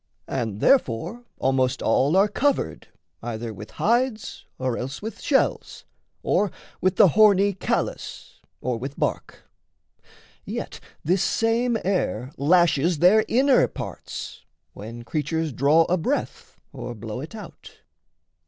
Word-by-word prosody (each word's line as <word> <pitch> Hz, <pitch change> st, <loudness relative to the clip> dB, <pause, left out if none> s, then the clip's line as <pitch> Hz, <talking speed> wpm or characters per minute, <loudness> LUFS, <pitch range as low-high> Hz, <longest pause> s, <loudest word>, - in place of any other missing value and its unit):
And 110 Hz, -6 st, -3 dB
therefore 240 Hz, -, +1 dB
almost 130 Hz, 0 st, +1 dB
all 145 Hz, +7 st, +3 dB
Are 200 Hz, +2 st, +5 dB
covered 255 Hz, -, -1 dB, 0.3 s
either 115 Hz, -1 st, -5 dB
with 105 Hz, +2 st, -10 dB
hides, 235 Hz, 0 st, 0 dB
or 130 Hz, -2 st, -1 dB
else 135 Hz, +3 st, -5 dB
with 220 Hz, 0 st, -7 dB
shells, 270 Hz, -2 st, 0 dB, 0.4 s
Or 205 Hz, -, +2 dB, 0.3 s
with 185 Hz, 0 st, +2 dB
the 185 Hz, -, +7 dB
horny 205 Hz, +1 st, +5 dB
callus, 190 Hz, -, -3 dB, 0.2 s
or 125 Hz, -1 st, -1 dB
with 135 Hz, +4 st, -6 dB
bark. -, -, -3 dB, 1.0 s
Yet -, -, -6 dB, 0.2 s
this 180 Hz, +4 st, +2 dB
same 230 Hz, +4 st, +1 dB
air 140 Hz, -, -1 dB
lashes 170 Hz, +1 st, +3 dB
their 190 Hz, +7 st, +5 dB
inner 265 Hz, +3 st, +4 dB
parts, -, -, -7 dB, 0.3 s
When 115 Hz, +3 st, -9 dB
creatures 155 Hz, +3 st, -2 dB
draw 145 Hz, +6 st, +4 dB
a 180 Hz, +3 st, 0 dB
breath 165 Hz, -, -3 dB
or 120 Hz, -1 st, -6 dB
blow 110 Hz, +2 st, -6 dB
it 160 Hz, +10 st, -8 dB
out. 215 Hz, -, -12 dB
165 Hz, 125 wpm, -24 LUFS, 125-210 Hz, 1.0 s, the